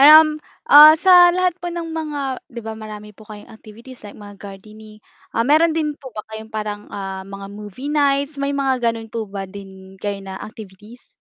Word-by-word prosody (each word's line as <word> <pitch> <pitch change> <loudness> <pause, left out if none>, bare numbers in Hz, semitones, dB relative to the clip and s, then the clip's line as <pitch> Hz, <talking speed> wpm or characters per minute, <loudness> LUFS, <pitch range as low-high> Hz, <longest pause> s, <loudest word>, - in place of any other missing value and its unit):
Um, 305 +1 +7 0.3
ah, 300 +2 +10
sa 355 0 +7
lahat 365 -1 +2
po 350 - -4
ng 340 -1 -5
mga 310 -2 -4 0.3
'di 235 -3 -8
ba 220 - -5
marami 210 -1 -10
po 215 +1 -18
kayong 215 +2 -12
activities 230 +4 -14
like 205 - -11
mga 205 -1 -12
gardening. 215 +2 -12 0.4
Ah, 230 - +1
meron 315 +4 +3
din 305 -2 -1
po 265 - -9
ba 215 - -5
kayong 220 0 -8
parang, 210 -1 -5
ah, 195 -1 -6
mga 195 0 -9
movie 210 +7 -7
nights, 280 0 0
may 280 0 -1
mga 265 -2 0
ganun 225 -1 -8
po 225 -3 -4
ba 195 -1 -6
din 190 -1 -12
kayo 205 -1 -3
na 190 0 -8
activities? 215 +2 -13
220 Hz, 195 wpm, -20 LUFS, 205-290 Hz, 0.4 s, ah